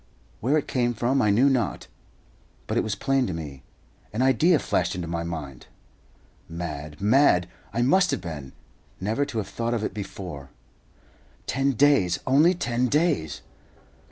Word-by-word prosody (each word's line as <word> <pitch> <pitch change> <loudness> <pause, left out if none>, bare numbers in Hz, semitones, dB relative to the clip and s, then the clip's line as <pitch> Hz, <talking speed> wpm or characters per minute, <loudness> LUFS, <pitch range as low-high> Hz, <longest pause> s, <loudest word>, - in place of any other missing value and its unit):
Where 135 +7 +2
it 150 - -2
came 120 -2 0
from 125 +4 +1
I 105 - +3
knew 115 +7 +4
not; 125 -7 0 0.8
but - - -3
it - - +3
was 110 - -2
plain 135 -1 +1
to 95 - -3
me. 70 -5 -7 0.5
An 115 +4 0
idea 150 +7 +4
flashed - - -1
into 90 -1 -4
my 85 0 -2
mind! 75 -7 -6 0.8
Mad, 75 -3 -6
mad, 105 -4 +4 0.2
I 120 - 0
must 180 +8 +4
have - - 0
been, 75 -6 -7 0.5
never 110 +9 0
to 115 - -6
have 105 - -2
thought 115 +1 -2
of 110 - -2
it - - -2
before. 95 -9 -7 1.0
Ten 135 +1 0
days! 130 -10 +3
Only 150 +7 +4
ten 120 -6 0
days! 145 - 0
115 Hz, 155 wpm, -25 LUFS, 85-135 Hz, 1.0 s, knew